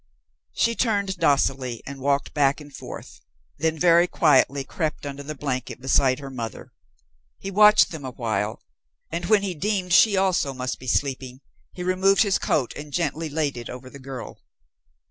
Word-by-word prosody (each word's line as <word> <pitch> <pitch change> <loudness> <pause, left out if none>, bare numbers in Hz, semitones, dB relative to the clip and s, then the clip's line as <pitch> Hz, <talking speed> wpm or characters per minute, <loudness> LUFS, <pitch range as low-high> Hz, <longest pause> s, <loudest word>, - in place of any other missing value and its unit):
She 230 - +2
turned 200 -5 0
docilely 135 -6 +1
and 140 0 -8
walked 140 +1 0
back 140 -1 +2
and 145 -2 -12
forth, - - -10 0.4
then 160 +1 0
very 170 +1 +5
quietly 140 -5 +3
crept 155 +1 -4
under 140 0 -6
the 155 +2 -6
blanket 130 -4 -4
beside 130 0 +2
her 140 -2 -8
mother. 115 -5 -7 0.6
He 195 - -6
watched 210 0 +6
them 160 -4 -7
a 130 - -4
while, 110 -4 -3 0.5
and 170 +1 -3
when 210 -2 +4
he 190 -2 -2
deemed 185 +1 -1
she 200 +1 +6
also 185 -8 +1
must 125 0 -4
be 130 - -11
sleeping, 130 0 -2 0.3
he 180 - -7
removed 190 +2 +3
his 200 -3 +1
coat 130 -5 0
and 145 0 -8
gently 160 0 -2
laid 145 -2 -1
it 120 - -7
over 130 +1 -9
the 140 - -11
girl. 130 -1 -8
145 Hz, 170 wpm, -24 LUFS, 130-180 Hz, 0.6 s, watched